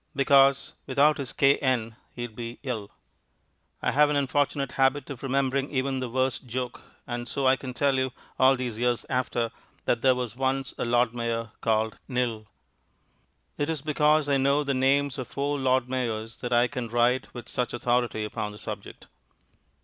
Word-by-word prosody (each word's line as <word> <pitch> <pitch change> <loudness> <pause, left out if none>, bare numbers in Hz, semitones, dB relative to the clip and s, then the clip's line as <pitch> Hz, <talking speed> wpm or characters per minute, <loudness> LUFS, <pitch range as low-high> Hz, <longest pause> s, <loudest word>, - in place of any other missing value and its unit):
Because 135 0 +4
without 145 +3 +3
his 135 -2 -3
K.N., 130 -6 +2 0.2
he'd 120 -3 -6
be 115 0 -6
ill." 110 -7 -4 0.9
I - - +2
have 150 +1 +4
an 150 - +1
unfortunate 140 -1 0
habit 135 +1 +1
of 130 - -7
remembering 135 0 0
even 135 -1 -1
the 130 -1 -3
worst 130 +1 -1
joke, 125 +1 -4 0.2
and 120 0 -5
so 140 - -2
I 130 0 +6
can 130 -2 -7
tell 140 0 +2
you, 130 0 0 0.3
all 130 +1 +6
these 125 -4 -4
years 120 -1 +1
after, 125 -2 0 0.3
that 115 - +1
there 130 0 +5
was 125 -3 -4
once 135 0 -1
a - - 0
Lord 120 0 +2
Mayor 115 -2 -2
called 110 -1 0
Knill. 120 -4 -1 1.1
It 145 +1 0
is 155 -4 -2
because 150 0 +3
I 140 -1 +3
know 140 +2 +2
the 140 -1 0
names 135 +1 +2
of 130 - -4
four 145 +1 -2
Lord 130 -1 +2
Mayors 115 -3 -3
that 120 - -4
I 120 0 +4
can 125 -2 -4
write 120 +2 +1
with 120 -1 -8
such 125 -1 -2
authority 120 -2 0
upon 105 0 -4
the - - -11
subject. - - -8
130 Hz, 175 wpm, -27 LUFS, 120-140 Hz, 1.1 s, I